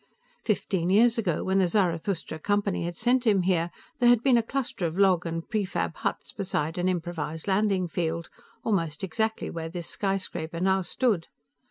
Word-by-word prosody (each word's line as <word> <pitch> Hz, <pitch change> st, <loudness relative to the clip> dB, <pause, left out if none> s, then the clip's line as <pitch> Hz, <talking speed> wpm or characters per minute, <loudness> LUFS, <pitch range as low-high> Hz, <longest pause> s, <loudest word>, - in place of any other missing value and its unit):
Fifteen 190 Hz, -5 st, 0 dB
years 230 Hz, +4 st, +5 dB
ago, 180 Hz, -8 st, 0 dB
when 190 Hz, +1 st, +2 dB
the 185 Hz, -, +4 dB
Zarathustra 170 Hz, -3 st, 0 dB
Company 205 Hz, -1 st, 0 dB
had 175 Hz, 0 st, -4 dB
sent 245 Hz, +3 st, +2 dB
him 200 Hz, -4 st, +4 dB
here, 175 Hz, -2 st, +1 dB, 0.3 s
there 240 Hz, -1 st, +5 dB
had 240 Hz, -1 st, +5 dB
been 265 Hz, -3 st, +5 dB
a 235 Hz, -, +5 dB
cluster 230 Hz, -7 st, -2 dB
of 165 Hz, +2 st, -6 dB
log 185 Hz, -3 st, +4 dB
and 165 Hz, 0 st, -4 dB
prefab 205 Hz, -4 st, -1 dB
huts -, -, -3 dB
beside 165 Hz, -4 st, -2 dB
an 180 Hz, +1 st, +2 dB
improvised 165 Hz, -2 st, -3 dB
landing 195 Hz, -2 st, +2 dB
field, 165 Hz, 0 st, -2 dB, 0.4 s
almost 165 Hz, -8 st, -1 dB
exactly 220 Hz, +4 st, -1 dB
where 165 Hz, -1 st, -5 dB
this 175 Hz, 0 st, -5 dB
skyscraper 185 Hz, -4 st, -2 dB
now 190 Hz, +1 st, +2 dB
stood. 200 Hz, -3 st, 0 dB
185 Hz, 170 wpm, -27 LUFS, 165-210 Hz, 0.4 s, years